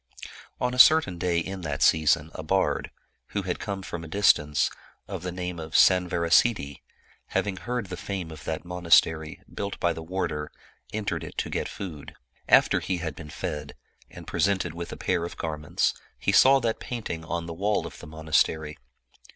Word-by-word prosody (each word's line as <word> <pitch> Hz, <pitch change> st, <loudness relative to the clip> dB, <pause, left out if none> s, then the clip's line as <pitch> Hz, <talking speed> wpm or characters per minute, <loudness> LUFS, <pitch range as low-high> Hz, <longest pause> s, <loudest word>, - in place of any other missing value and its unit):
" -, -, -15 dB
On 125 Hz, 0 st, 0 dB
a 125 Hz, -, -3 dB
certain 140 Hz, -, +6 dB
day 90 Hz, -1 st, +1 dB
in 95 Hz, +3 st, -3 dB
that 75 Hz, -4 st, -2 dB
season 80 Hz, 0 st, +3 dB
a -, -, -6 dB
bard, 95 Hz, +4 st, 0 dB, 0.5 s
who 100 Hz, -, 0 dB
had 90 Hz, -1 st, -3 dB
come 100 Hz, -2 st, -4 dB
from 85 Hz, -2 st, -6 dB
a -, -, -8 dB
distance, 75 Hz, -5 st, +3 dB, 0.4 s
of 95 Hz, -3 st, -5 dB
the 90 Hz, +1 st, -4 dB
name 90 Hz, -1 st, -5 dB
of 80 Hz, 0 st, -7 dB
Sanvarasiddhi, 85 Hz, -, +3 dB, 0.5 s
having 100 Hz, -2 st, -1 dB
heard 120 Hz, +2 st, -3 dB
the 90 Hz, -1 st, -7 dB
fame 95 Hz, -5 st, -5 dB
of 80 Hz, -, -10 dB
that 80 Hz, +2 st, -3 dB
monastery, 85 Hz, -3 st, +2 dB
built 100 Hz, 0 st, -4 dB
by 85 Hz, -1 st, +2 dB
the 80 Hz, -, -7 dB
warder, 80 Hz, -3 st, -3 dB, 0.4 s
entered 105 Hz, -1 st, -2 dB
it -, -, -9 dB
to -, -, -2 dB
get -, -, -2 dB
food. 80 Hz, -7 st, -8 dB, 0.3 s
After -, -, +5 dB
he 95 Hz, -, -2 dB
had 80 Hz, -3 st, -4 dB
been 75 Hz, -2 st, -10 dB
fed, 75 Hz, 0 st, -5 dB, 0.3 s
and -, -, -11 dB
presented 95 Hz, -4 st, 0 dB
with 85 Hz, 0 st, -6 dB
a -, -, -7 dB
pair 90 Hz, -2 st, 0 dB
of 85 Hz, -, -6 dB
gar 80 Hz, -1 st, -3 dB
ments, 75 Hz, -, 0 dB, 0.2 s
he -, -, 0 dB
saw 135 Hz, +1 st, +7 dB
that 115 Hz, -2 st, -1 dB
painting 110 Hz, -9 st, -5 dB
on 85 Hz, +1 st, -3 dB
the 85 Hz, -, -6 dB
wall 100 Hz, +5 st, 0 dB
of -, -, -9 dB
the -, -, -10 dB
monastery. 80 Hz, 0 st, 0 dB
85 Hz, 185 wpm, -26 LUFS, 80-95 Hz, 0.5 s, saw